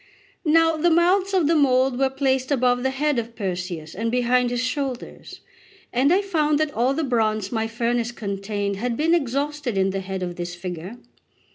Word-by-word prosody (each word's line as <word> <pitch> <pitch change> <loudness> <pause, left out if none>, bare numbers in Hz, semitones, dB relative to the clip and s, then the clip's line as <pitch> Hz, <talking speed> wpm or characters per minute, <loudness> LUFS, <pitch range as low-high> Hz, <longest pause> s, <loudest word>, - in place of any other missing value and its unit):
Now 325 +1 +4
the 340 +3 +3
mouths 365 +4 +3
of 370 -5 +2
the 325 - +3
mould 260 -4 +3
were 270 -1 +3
placed 265 -1 0
above 250 -3 +2
the 265 - +1
head 280 0 0
of 230 0 -6
Perseus 180 -5 -4
and 225 +4 -2
behind 250 +1 +2
his 245 0 -1
shoulders; 255 -1 -4 0.5
and 265 +5 +3
I 385 +3 +3
found 305 -6 +1
that 310 -1 0
all 250 +4 +1
the 320 - -1
bronze 215 -6 0
my 225 -2 -1
furnace 235 +1 -1
contained 200 -2 -3
had 235 +2 -2
been 325 +2 +2
exhausted 285 -4 -1
in 190 0 +2
the 195 - -2
head 190 0 -4
of 175 -1 -5
this 175 0 -5
figure. 180 +4 -7
250 Hz, 185 wpm, -23 LUFS, 215-290 Hz, 0.5 s, Now